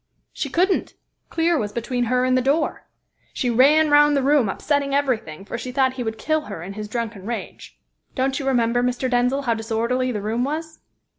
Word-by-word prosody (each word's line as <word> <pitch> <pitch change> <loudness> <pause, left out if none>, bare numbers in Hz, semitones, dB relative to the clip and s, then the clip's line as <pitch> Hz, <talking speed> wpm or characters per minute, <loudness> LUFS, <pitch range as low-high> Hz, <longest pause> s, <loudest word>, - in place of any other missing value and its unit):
"She 280 - -3
couldn't. 365 +7 +1 0.3
Clear 330 -1 +1
was 205 -3 -3
between 240 +2 -2
her 250 +2 +1
and 255 0 +2
the 255 - +3
door. 285 +5 0 0.5
She 245 - 0
ran 295 +6 +5
round 295 0 +5
the 275 - +1
room, 275 -6 +3
upsetting 280 +5 -1
everything, 220 - -1
for 235 - -5
she 255 - -5
thought 260 0 +2
he 260 - -6
would 220 -1 -4
kill 310 +4 0
her 180 -5 -7
in 195 +3 -7
his 210 +1 -6
drunken 220 -3 -5
rage. 235 -1 -6 0.4
Don't 265 +1 0
you 275 - -4
remember, 245 -2 +2
Mr. 250 +1 -1
Denzil, 250 +2 +1
how 235 -3 +1
disorderly 230 +3 -1
the 215 - -3
room 220 +4 -1
was? 315 +3 -4
255 Hz, 200 wpm, -22 LUFS, 230-280 Hz, 0.5 s, ran